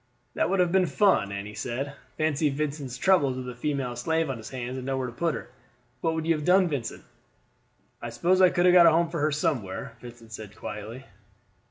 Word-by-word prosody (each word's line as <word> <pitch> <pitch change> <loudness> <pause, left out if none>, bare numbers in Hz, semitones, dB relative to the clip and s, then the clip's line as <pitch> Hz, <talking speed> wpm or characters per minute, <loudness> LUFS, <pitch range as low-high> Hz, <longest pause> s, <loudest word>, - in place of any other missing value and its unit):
"That - - 0
would 195 - +1
have 180 -1 +3
been 185 -1 +3
fun," 145 - +2
Annie 100 +1 -5
said. 130 +6 -4 0.2
"Fancy 155 -1 +1
Vincent's 140 -3 -3
troubles 140 -6 +3
with 130 -1 -5
a 125 - -5
female 130 -1 -2
slave 160 +1 0
on 130 - -5
his 110 - -9
hands 125 -1 -5
and 130 - -6
nowhere 135 -1 -1
to 120 - -6
put 165 +5 -1
her. - - -8 0.5
What 160 +4 0
would 160 -1 -2
you 165 - +3
have 150 -2 -3
done, 180 +2 +4
Vincent?" 140 -7 -4 1.0
"I - - -5
suppose 185 +2 +2
I 185 - +7
could 175 0 +1
have 180 - +6
got 175 -2 +8
a - - +7
home 165 +1 +2
for 170 - -3
her 150 +1 +1
somewhere," 140 - -2
Vincent 120 -2 -12
said 105 -1 -9
quietly. 110 +5 -7
140 Hz, 215 wpm, -27 LUFS, 120-165 Hz, 1.0 s, got